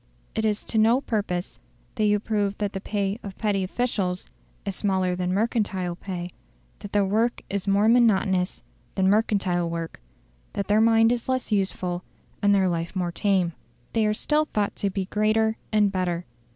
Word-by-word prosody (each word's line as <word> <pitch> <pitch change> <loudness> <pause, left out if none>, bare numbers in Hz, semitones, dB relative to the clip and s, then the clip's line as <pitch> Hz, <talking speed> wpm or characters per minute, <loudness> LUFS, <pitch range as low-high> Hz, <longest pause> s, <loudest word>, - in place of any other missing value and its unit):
It 220 - -1
is 210 -1 0
to 220 - 0
no 230 +4 +5
purpose 200 -8 -3 0.3
that 215 - 0
you 210 0 +3
prove 205 -2 -1
that 205 -1 -2
the 195 - -4
pay 200 +1 -2
of 195 -2 -8
petty 205 -3 0
officials 185 -3 -1 0.4
is 200 -2 -2
smaller 190 -3 +1
than 180 0 -1
mercantile 195 -4 0
pay; 180 -1 -6 0.5
that 205 -1 -9
their 205 -1 +3
work 225 +5 0
is 200 0 -2
more 200 +2 +3
monotonous 200 -6 +3 0.3
than 190 0 +3
mercantile 195 -5 +1
work; 165 -1 -5 0.5
that 200 - -2
their 210 +1 +4
mind 225 0 +5
is 245 +1 -2
less 255 -3 -1
useful 185 -3 -1 0.4
and 205 0 +4
their 190 -1 +3
life 170 +1 -2
more 180 -2 -1
tame. 185 -2 +1 0.4
They 220 -2 +2
are 210 - +2
still 305 +6 +1
thought 210 -8 -1
to 200 - 0
be 195 0 -2
greater 215 +2 +1
and 210 -2 +3
better. 180 -2 -1
200 Hz, 175 wpm, -25 LUFS, 185-215 Hz, 0.5 s, no